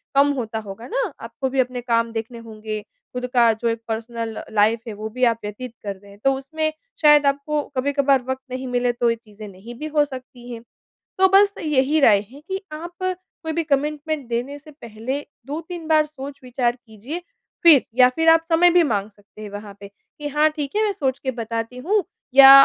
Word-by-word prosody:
कम 280 +1 +5
होता 225 -4 -3
होगा 200 +4 -8
ना, - - -1
आपको 235 +4 -4
भी 270 +1 -1
अपने 250 -1 0
काम 230 -1 +1
देखने 225 +1 -4
होंगे, 215 -1 -6 0.3
खुद 250 0 -3
का 235 -2 +6
जो 220 +2 -3
एक 230 0 -2
पर्सनल 225 0 -4
लाइफ़ 220 +2 +3
है, 225 - -4
वो 215 +1 -6
भी 255 +3 -4
आप 230 -2 +4
व्यतीत 215 +4 -6
कर 200 -1 -3
रहे 200 +1 -17
हैं। 200 - -16
तो 270 - +4
उसमें 310 +4 -2 0.3
शायद 295 -1 +7
आपको 285 +2 0 0.2
कभी-कभार 280 0 +2
वक़्त 260 0 -3
नहीं 260 +1 -4
मिले, 245 0 +1
तो 240 0 +1
ये 230 - +1
चीज़ें 215 -2 -12
नहीं 200 +5 -11
भी 310 - -4
हो 295 -1 +5
सकती 255 -3 -10
हैं। 230 -1 -7 0.6
तो 380 - +7
बस 400 0 +5
यही 300 0 +2
राय 220 -8 +6
है 280 +2 -13
कि 385 0 -3
आप 340 +3 -7
कोई 365 -3 -4
भी 335 +1 0
कमिटमेंट 300 -1 -1
देने 245 +5 -3
से 305 +2 -15
पहले, 245 0 -5 0.2
2-3 320 +3 -6
बार 310 -1 +4
सोच-विचार 265 -4 -3
कीजिए। 245 - -8 0.4
फिर 315 -6 +8
या 250 0 +7
फिर 325 0 +4
आप 325 0 +7
समय 340 +2 +6
भी 355 0 +5
माँग 210 -8 0
सकते 205 +1 -17
हैं 210 - -7
वहाँ 205 0 -8
पे 200 - -9
कि 250 +8 -10
हाँ, 300 +2 +3
ठीक 300 -1 -5
है, 430 - +3
मैं 425 - +2
सोच 270 -9 -1
के 260 - -2
बताती 230 +1 -4
हूँ। 390 +10 +1 0.3
या 270 0 +11
255 Hz, 205 wpm, -22 LUFS, 230-300 Hz, 0.6 s, या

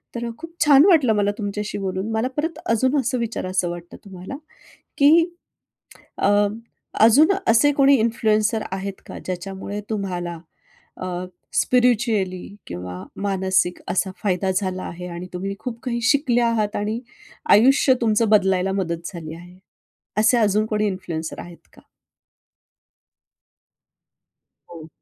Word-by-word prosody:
तर 235 0 -3
खूप 330 +1 -10
छान 290 +2 +7
वाटलं 295 - +5
मला 205 0 +2
तुमच्याशी 210 0 -4
बोलून. 190 +2 -3
मला 220 +3 0
परत 325 +2 -2
अजून 260 +5 +2
असं 255 0 -1
विचारायचं 185 -6 -2
वाटतं 175 0 -8
तुम्हाला, 190 +6 -8 0.6
की 320 +4 +6 0.9
अ, - - +3 0.7
अजून 275 - +6
असे 235 +6 +5
कोणी 275 0 +5
इन्फ्लुएन्सर 220 -1 +1
आहेत 195 0 -5
का - - -8
ज्याच्यामुळे 190 +3 -5
तुम्हाला 180 -5 -3 0.6
अ, - - -3 0.5
स्पिरिच्युअली 225 -7 +1 0.2
किंवा 90 +1 -7 0.2
मानसिक 190 -2 +1
असा 190 +1 0
फायदा 190 -1 0
झाला 185 -2 -1
आहे 180 +1 -7
आणि 175 +1 -7
तुम्ही 195 +2 -4
खूप 240 -3 -6
काही 235 -2 -2
शिकले 275 -4 +2
आहात 225 -3 0
आणि 215 +3 -2 0.5
आयुष्य 260 +4 +6
तुमचं 225 0 +2
बदलायला 190 -2 +3
मदत 170 -3 -3
झाली 160 -2 -7
आहे. 175 +2 -14 0.6
असे 220 +3 +4
अजून 215 0 +2
कोणी 215 -1 0
इन्फ्लुएन्सर 170 -5 -4
आहेत 175 -1 -13
का? - - -17 2.9
हो. 160 -2 -10
205 Hz, 125 wpm, -22 LUFS, 185-235 Hz, 2.9 s, छान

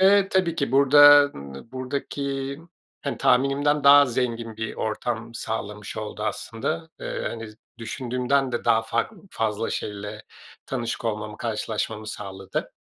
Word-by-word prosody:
Eee, 195 +1 +5
tabii 185 -4 +1
ki 140 -4 -2
burada, 145 +1 +8
ımm, 70 - -9
buradaki, 135 +1 -3 0.5
hani, 140 - -2
tahminimden 140 +3 +2
daha 140 0 +9
zengin 115 -2 -2
bir 110 0 -4
ortam 115 +1 -3
sağlamış 105 -3 -5
oldu 105 -1 -5
aslında. 155 +9 -3
Eee, - - -4
hani, 115 -1 -6 0.3
düşündüğümden 125 +3 -1
de 120 - -2
daha 110 - +4
fark 115 - -1 0.2
fazla 110 0 -1
şeyle 105 +1 -5 0.4
tanışık 120 -2 -3
olmamı, 105 -1 -3
karşılaşmamı 110 -1 -3
sağladı. 95 -3 -5
120 Hz, 125 wpm, -25 LUFS, 110-140 Hz, 0.5 s, daha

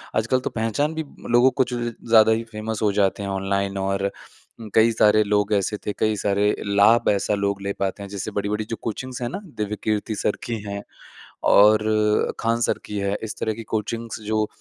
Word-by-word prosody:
आजकल 115 +4 +2
तो 130 - -3
पहचान 115 +7 -1
भी 160 - -2 0.3
लोगों 120 +2 +5
को 130 0 +2
जो 120 - -2
ज़्यादा 110 -1 +4
ही 110 +1 +1
फ़ेमस 110 0 -4
हो 105 -2 +3
जाते 100 0 +1
हैं 100 - -3
ऑनलाइन 100 0 -1
और 100 +1 -1 0.6
कई 115 +1 +5
सारे 110 -1 +4
लोग 105 0 +1
ऐसे 105 +1 0
थे, 105 - -1
कई 110 +1 0
सारे 100 +1 +1
लाभ 100 +3 +4
ऐसा 100 +1 +1
लोग 100 -1 -1
ले 100 0 -2
पाते 100 +1 -2
हैं। 100 - -8
जैसे 100 +1 -5
बड़ी-बड़ी 105 +1 -2
जो 115 - -2
कोचिंग्स 125 +3 -5
है 120 - -1
ना? 195 - -5
दिव्यकीर्ति 105 - -3
सर 105 - -1
की 115 - -3
हैं 100 0 -5 0.7
और 105 +1 +6 0.6
खान 115 +1 0
सर - - +1
की 105 - -5
है। 100 0 -1
इस 110 0 -5
तरह 110 - -1
की 115 +2 -8
कोचिंग्स 115 +1 -3
जो 110 0 +1
105 Hz, 195 wpm, -23 LUFS, 100-115 Hz, 0.7 s, और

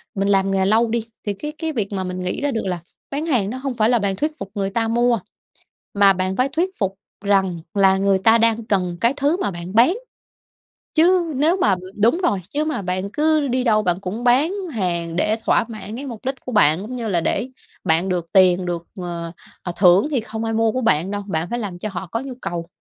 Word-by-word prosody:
mình 195 0 0
làm 195 -1 +2
nghề 190 -1 +1
lâu 225 +4 +3
đi 230 0 -2 0.2
thì 205 - -1
cái 300 +9 -6
cái 320 -1 -3
việc 210 -6 -1
mà 190 -1 -2
mình 185 0 -4
nghĩ 180 +7 -3
ra 290 - 0
được 225 -5 -2
là 180 -2 -2 0.3
bán 290 +3 -2
hàng 240 -11 +1
nó 255 - -4
hông 265 -1 -3
phải 220 -1 +2
là 240 -2 +3
bạn 200 -1 -1
thuyết 305 +8 -2
phục 195 - -7
người 195 -1 -1
ta 225 +2 0
mua, 235 0 +2 0.7
mà 200 -1 +5
bạn 185 +1 -1
phải 255 +2 +1
thuyết 340 +6 0
phục 195 -1 -1 0.3
rằng 190 -4 +2
là 195 -1 +4
người 195 0 +2
ta 225 +4 +5
đang 230 0 +2
cần 180 -5 0
cái 235 +3 +4
thứ 290 +5 +1
mà - - 0
bạn 175 +2 -7
bán. 260 - +5 1.0
Chứ 345 0 +3
nếu 320 +7 +2
mà 210 - +3
ừm, 185 0 -3
đúng 235 +10 +4
rồi, 200 - +1
chứ 300 +2 -1
mà 305 -9 -2
bạn 185 +2 -2
cứ 305 -1 +2
đi 255 0 0
đâu 215 -3 +3
bạn 180 -2 0
cũng 200 +5 -5
bán 265 +9 +3 0.2
hàng 170 -6 -2
để 210 +5 +1
thỏa - - +3
mãn 215 -1 -8
cái 280 +3 -6
mục 240 -1 -8
đích 265 +1 -1
của 255 - -5
bạn, 160 -7 +4
giống 245 +5 -6
như 230 -2 -3
là 175 -4 +1
để 250 +9 -1 0.3
bạn 165 +4 +2
được 175 -2 -1
tiền 185 -1 +5
được, 170 -1 -3
ờ, 170 -2 -5 0.5
thưởng 185 +6 +5
thì 255 -5 +1
không 220 0 -6
ai 225 - -2
mua 225 0 +2
của 255 - -2
bạn 185 -4 +2
đâu. 205 0 -3
Bạn 165 -2 -2
phải 240 - -2
làm 185 -5 -5
cho 215 - -4
họ 185 0 -5
có 230 - -3
nhu 265 0 -6
cầu 170 -1 -4
210 Hz, 240 wpm, -21 LUFS, 185-250 Hz, 1.0 s, mà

